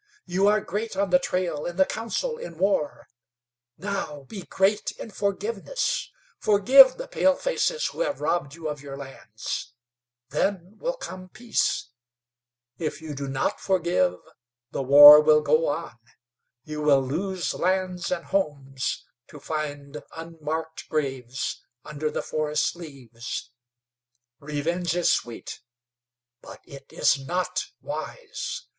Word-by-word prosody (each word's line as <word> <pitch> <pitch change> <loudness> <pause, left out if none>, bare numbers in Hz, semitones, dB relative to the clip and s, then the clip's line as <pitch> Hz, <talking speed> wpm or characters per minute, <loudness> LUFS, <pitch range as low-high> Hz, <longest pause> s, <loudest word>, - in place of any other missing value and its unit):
You 190 +3 +2
are 210 +1 +4
great 210 0 -4
on 200 -1 0
the 180 - +6
trail, 175 -5 -2
in 175 - -5
the 190 - +4
council, 350 - -3
in 170 -2 -8
war; 185 -5 0 0.7
now 170 -6 -4
be 195 +8 -8
great 195 +4 +1
in 225 - -8
forgiveness. 210 - -2 0.3
Forgive 255 +6 +7
the - - -6
palefaces 485 - +1
who - - -11
have 290 - -1
robbed 150 -2 -1
you 165 -1 -6
of 150 -2 -4
your 140 -1 -8
lands. 125 -3 -7 0.5
Then 195 0 -2
will - - -2
come 185 - -8
peace. 240 - -1 0.9
If 160 -3 -3
you 160 -2 -7
do 140 0 -5
not 135 0 -1
forgive, 190 +8 +1 0.6
the - - -2
war 145 +3 +11
will 150 0 +5
go 155 +2 +2
on; 145 -4 -4 0.6
you 150 0 -6
will 140 -3 +4
lose 180 +7 -2
lands 185 -1 -1
and 175 -2 -2
homes, 140 -8 -2 0.2
to - - -12
find 150 -2 -5 0.2
unmarked 160 -1 -5
graves 135 -4 -3 0.2
under 150 +1 -3
the - - -3
forest 155 +1 -1
leaves. 125 -8 -8 0.9
Revenge 160 +4 -2
is 175 -1 +3
sweet; 115 -1 -3 0.8
but - - -11
it 140 -1 -13
is 140 - +2
not 180 +4 -1 0.2
wise. - - -6
170 Hz, 130 wpm, -25 LUFS, 145-195 Hz, 0.9 s, war